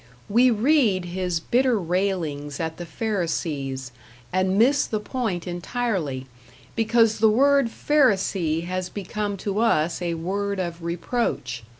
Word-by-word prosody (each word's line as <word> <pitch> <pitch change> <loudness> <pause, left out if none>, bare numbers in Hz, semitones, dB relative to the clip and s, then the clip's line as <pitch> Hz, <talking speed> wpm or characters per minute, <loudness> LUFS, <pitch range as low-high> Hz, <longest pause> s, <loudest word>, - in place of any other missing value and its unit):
We 240 +5 +5
read 225 - +3
his 180 -1 -2
bitter 245 +6 +2
railings 170 -6 -2
at 160 -1 -3
the 175 - -7
Pharisees, 150 - -2 0.4
and 185 +1 +1
miss 270 +6 +4
the 215 - -2
point 210 -6 -3
entirely, 175 - -2 0.5
because 225 -1 +3
the 220 0 +5
word 275 +2 +4
Pharisee 195 - +1
has 185 0 -3
become 205 +1 -4
to 205 0 -1
us 175 -8 +2
a 170 -1 -1
word 200 +4 -2
of 170 -2 -4
reproach. 170 - -2
190 Hz, 125 wpm, -24 LUFS, 170-225 Hz, 0.5 s, We